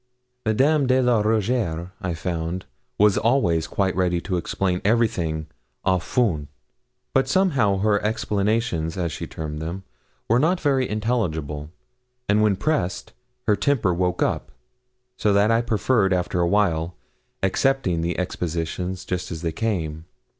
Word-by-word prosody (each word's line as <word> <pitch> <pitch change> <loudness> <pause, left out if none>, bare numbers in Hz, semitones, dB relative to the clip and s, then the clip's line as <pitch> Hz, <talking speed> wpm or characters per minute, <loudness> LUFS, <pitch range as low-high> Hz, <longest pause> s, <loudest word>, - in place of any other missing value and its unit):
Madame 135 +6 +3
de 130 +1 +4
la 125 -4 +3
Rougierre, 105 -5 0
I 90 -3 -2
found, 85 +2 -3 0.3
was 105 0 +4
always 105 -9 +2
quite 95 -2 0
ready 90 -1 +1
to 95 0 -2
explain 90 +1 -1
everything 90 -8 +1 0.4
'à 95 -2 +2
fond;' 85 - 0 0.7
but 135 - +3
somehow 140 - +2
her 105 +1 +2
'explications,' 105 -5 0
as 85 -3 -1
she - - -5
termed 75 -1 -5
them, 85 +4 -5 0.4
were 115 +2 +4
not 170 +6 +2
very 135 -5 +1
intelligible, 80 - -2 0.6
and 105 +1 +3
when 105 -2 +3
pressed 140 - -1 0.3
her 105 - +4
temper 105 -3 +1
woke 90 +1 0
up; - - -2 0.7
so 105 - +2
that 100 +2 +4
I 115 +1 +3
preferred, 110 -3 +2
after 90 0 0
a 85 - +3
while, 90 -4 +1 0.5
accepting 95 -3 +1
the 85 +1 -2
expositions 90 +1 -3
just 90 0 -3
as 80 0 -6
they 85 - 0
came. 80 -5 -2
95 Hz, 140 wpm, -23 LUFS, 85-115 Hz, 0.7 s, de